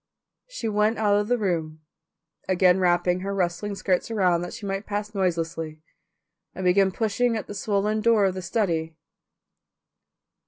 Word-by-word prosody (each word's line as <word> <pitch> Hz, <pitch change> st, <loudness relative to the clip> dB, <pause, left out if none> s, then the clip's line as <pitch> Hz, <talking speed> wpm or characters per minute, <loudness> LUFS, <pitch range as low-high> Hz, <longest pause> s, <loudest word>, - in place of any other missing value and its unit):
She -, -, -5 dB
went 210 Hz, +1 st, +1 dB
out 210 Hz, -2 st, +2 dB
of 205 Hz, -, -2 dB
the 245 Hz, +1 st, +2 dB
room, 165 Hz, -7 st, -2 dB, 0.7 s
again 185 Hz, 0 st, +4 dB
wrapping 180 Hz, 0 st, +2 dB
her 195 Hz, +1 st, -3 dB
rustling 190 Hz, +2 st, -1 dB
skirts 190 Hz, 0 st, 0 dB
around 185 Hz, -6 st, +2 dB
that 175 Hz, -, -5 dB
she 205 Hz, -, -8 dB
might 195 Hz, +1 st, -3 dB
pass 210 Hz, +1 st, -3 dB
noiselessly, 165 Hz, -4 st, -2 dB, 0.8 s
and 190 Hz, -, -4 dB
began 190 Hz, +1 st, +4 dB
pushing 225 Hz, +4 st, 0 dB
at 215 Hz, -, -5 dB
the -, -, -8 dB
swollen 210 Hz, +1 st, 0 dB
door 225 Hz, -2 st, +4 dB
of 190 Hz, -, +1 dB
the 185 Hz, -, -5 dB
study. 170 Hz, -5 st, -1 dB
195 Hz, 155 wpm, -25 LUFS, 175-210 Hz, 0.8 s, again